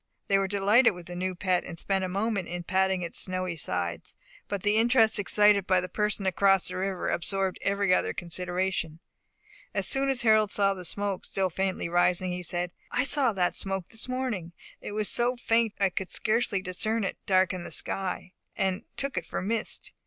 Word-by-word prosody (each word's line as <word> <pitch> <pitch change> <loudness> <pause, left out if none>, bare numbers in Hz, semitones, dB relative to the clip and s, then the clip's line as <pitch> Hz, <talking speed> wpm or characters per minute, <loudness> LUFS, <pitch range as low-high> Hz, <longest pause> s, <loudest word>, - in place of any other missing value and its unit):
They 195 0 +4
were 195 - 0
delighted 205 +3 +4
with 175 -1 -10
the 175 0 -8
new 185 +1 -2
pet, 180 -1 +1
and 170 - -8
spent 195 +2 -1
a 185 - -2
moment 200 0 -1
in 175 0 -5
patting 190 0 +1
its 170 - -2
snowy 185 -2 -2
sides; 90 - -2 0.3
but 200 -2 -4
the 205 +1 +3
interest 225 -2 +4
excited 205 -1 +4
by 185 -1 +4
the 180 - -3
person 210 +1 -1
across 195 0 +3
the - - -5
river 190 -1 -2
absorbed 190 +2 0
every 200 -1 +1
other - - +2
consideration. 175 -1 -3 0.8
As 195 -2 +1
soon 275 0 +3
as 265 -3 0
Harold 215 -2 +4
saw 200 -1 +3
the 185 -2 -7
smoke 200 0 -2
still 190 -2 -1
faintly 190 0 -1
rising, 175 +1 +2
he 180 0 -3
said, 175 0 -2 0.2
"I 250 - +1
saw 275 -3 +2
that 180 -2 +1
smoke 195 -2 -3
this 225 +3 -4
morning. 235 -10 -3 0.3
It - - -6
was 215 -1 0
so 240 +1 +1
faint 230 -2 +1
I 195 -2 +2
could 190 +1 -4
scarcely 215 -3 0
discern 215 +5 0
it 195 - -3
darken 185 -1 +2
the - - -7
sky, 185 -1 -3 0.2
and 190 -1 0 0.2
took 275 -1 -3
it - - -14
for - - -3
mist. 215 +3 -2
195 Hz, 195 wpm, -28 LUFS, 180-210 Hz, 0.8 s, They